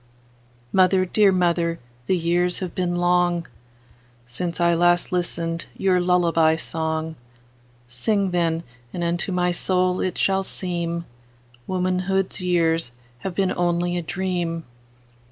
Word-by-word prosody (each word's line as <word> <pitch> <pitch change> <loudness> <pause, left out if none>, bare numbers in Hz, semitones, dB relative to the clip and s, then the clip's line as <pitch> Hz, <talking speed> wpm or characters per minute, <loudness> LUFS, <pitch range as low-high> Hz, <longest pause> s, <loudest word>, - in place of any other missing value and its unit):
Mother, 185 0 +4
dear 200 +2 +4
mother, 170 -2 +1 0.3
the 185 - +2
years 175 +1 +1
have 185 -3 -4
been 175 -1 -1
longSince 125 -5 -3
I 170 0 +4
last 175 +1 +3
listened 170 -2 -2
your 185 -2 +2
lullaby 170 -3 +3
song:Sing, 125 - -4
then, 165 -2 0 0.3
and 175 - -3
unto 170 +3 0
my 180 -1 +1
soul 180 +1 +1
it 185 - -2
shall 195 0 +2
seemWomanhood's 170 +2 -3
years 165 -6 +1 0.3
have 185 +5 -5
been 190 -1 +1
only 175 0 0
a 175 - -1
dream. 175 -1 -2
175 Hz, 110 wpm, -23 LUFS, 160-180 Hz, 0.3 s, Mother